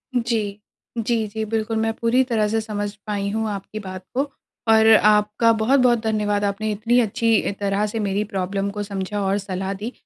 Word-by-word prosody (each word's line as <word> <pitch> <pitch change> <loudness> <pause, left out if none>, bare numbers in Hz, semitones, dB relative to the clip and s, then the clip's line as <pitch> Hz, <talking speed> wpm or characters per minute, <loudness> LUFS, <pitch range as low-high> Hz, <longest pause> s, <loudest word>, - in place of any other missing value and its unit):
जी। 225 -4 -1 0.4
जी, 225 -1 0
जी 220 +1 -4
बिल्कुल 220 +1 -1
मैं 225 0 0
पूरी 235 +3 +2
तरह 215 -3 +2
से 225 +1 0
समझ 205 -2 -3 0.2
पाई 200 -1 -1
हूँ 220 +1 -1
आपकी 200 +1 -6
बात 185 -2 -7
को 275 +3 0 0.4
और 220 0 +6
आपका 210 +2 +4
बहुत-बहुत 240 +1 +3
धन्यवाद 210 -2 0
आपने 210 +2 -1
इतनी 230 +4 +2
अच्छी 225 -1 +2
तरह 200 +1 0
से 220 +2 -4
मेरी 200 0 0
प्रॉब्लम 195 +1 -1
को 205 0 -4
समझा 200 0 -3
और 195 +1 +1
सलाह 190 0 -3
दी। 210 +5 -5
210 Hz, 180 wpm, -22 LUFS, 200-225 Hz, 0.4 s, और